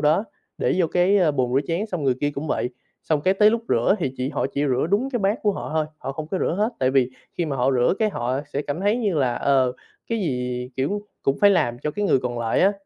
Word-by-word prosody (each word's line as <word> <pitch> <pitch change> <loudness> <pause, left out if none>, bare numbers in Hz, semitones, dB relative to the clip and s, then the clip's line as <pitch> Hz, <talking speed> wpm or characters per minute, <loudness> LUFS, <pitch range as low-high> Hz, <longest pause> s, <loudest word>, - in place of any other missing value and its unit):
đó, 155 +8 +3 0.3
để - - +1
vô 175 - +3
cái 180 -1 +3
bồn 125 -3 0
rửa 135 - +4
chén, 175 +6 -1
xong 180 -8 -4
người 130 -2 +3
kia 145 - +1
cũng 145 +3 -4
vậy. 125 - -1 0.3
Xong 155 -2 0
cái 185 +6 +2
tới 210 +2 +5
lúc 230 +1 -1
rửa 120 +11 +3
thì 135 -6 -2
chỉ 130 +1 -2
họ - - -1
chỉ 145 +1 0
rửa 130 +2 +1
đúng 240 +7 +1
cái 245 - -1
bát 200 +1 +1
của 210 - +2
họ - - -6
thôi, 155 -1 +1
họ 135 - -5
không 155 +2 -6
có 190 - -2
rửa - - 0
hết, 215 - +2
tại 130 0 +2
vì 130 -2 +2 0.3
khi 175 - +1
mà 140 - -2
họ 130 +1 +2
rửa 125 +6 +3
cái 215 -2 +2
họ 125 -1 -2
sẽ 145 - -1
cảm 145 +4 -4
thấy 205 +4 +2
như 210 -7 0
là, 130 -5 +1
ờ, 130 -3 +2 0.4
cái 230 - 0
gì, 125 -6 -2
kiểu, 195 +11 -1 0.2
cũng 135 - +1
phải 205 - +7
làm 120 -11 +1
cho 150 - -2
cái 205 +7 -2
người 195 - +4
còn 125 -1 -3
lại 115 -1 0
á, 195 +2 +5
150 Hz, 275 wpm, -23 LUFS, 130-195 Hz, 0.4 s, phải